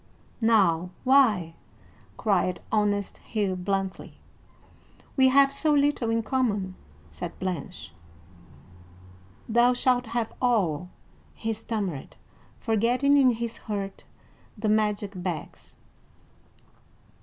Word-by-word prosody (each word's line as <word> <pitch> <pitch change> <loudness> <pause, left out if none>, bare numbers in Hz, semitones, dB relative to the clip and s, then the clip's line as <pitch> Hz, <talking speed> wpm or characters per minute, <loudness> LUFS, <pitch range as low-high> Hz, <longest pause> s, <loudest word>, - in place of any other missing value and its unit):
"Now, 190 -7 +3
why?" 225 -11 +4 0.6
cried 185 -3 +1
honest 205 -2 0
Hugh 205 -4 -2
bluntly. 190 +1 -3 1.0
"We 265 -1 +5
have 275 +1 +5
so 300 +1 +2
little 285 -5 +2
in 225 0 +1
common," 210 -6 -1 0.4
said 75 - -7
Blanche. 140 - -5 1.5
"Thou 240 +2 +4
shalt 250 -1 +1
have 230 0 -2
all," 180 - +1 0.5
he 225 0 -2
stammered, 205 - -4 0.4
forgetting, 245 +5 +2
in 260 -3 +5
his 230 0 -5
hurt, 200 -3 -5 0.5
the 215 0 -1
magic 210 -1 +1
bags. 175 -4 -6
215 Hz, 95 wpm, -26 LUFS, 185-245 Hz, 1.5 s, We